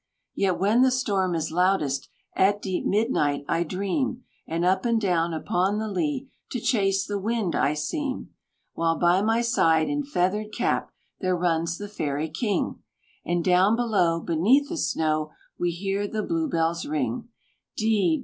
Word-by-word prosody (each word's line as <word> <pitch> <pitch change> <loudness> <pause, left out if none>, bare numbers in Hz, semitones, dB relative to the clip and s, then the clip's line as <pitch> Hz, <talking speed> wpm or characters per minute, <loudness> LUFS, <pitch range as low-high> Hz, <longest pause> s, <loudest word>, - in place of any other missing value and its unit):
"Yet 190 -3 +1
when 210 +6 +3
the 260 - +6
storm 200 -8 0
is 160 -1 -2
loudest, 165 -6 +1 0.3
At 200 +2 +3
deep 190 -3 -2
midnight 150 - +1
I 165 - +1
dream, 200 - -2 0.2
And 170 +2 -1
up 190 +1 +2
and 235 -1 +2
down 175 -5 +1
upon 180 +5 0
the 220 0 -2
lea 270 +7 -2 0.2
To 250 - -3
chase 195 -5 +1
the 205 -1 -3
wind 215 -3 -1
I 145 +2 +2
seem; 265 - -3 0.4
While 165 -1 0
by 175 +2 +3
my 225 +2 +2
side, 165 -9 +3
in 290 0 -1
feathered 210 -4 -1
cap, - - 0 0.3
There 185 -2 0
runs 170 -1 0
the 205 - -6
Fairy 155 -6 -3
King, 195 +4 -1 0.4
And 175 0 0
down 185 +4 +4
below, 200 -8 +2
Beneath 220 - +2
the 340 - -3
snow, 155 - 0 0.3
We 175 - +1
hear 195 +4 -2
the 215 0 -3
Blue 330 -2 -1
bells 165 -4 0
ring 145 - -2 0.5
D! 205 -7 +2
190 Hz, 160 wpm, -25 LUFS, 165-220 Hz, 0.5 s, the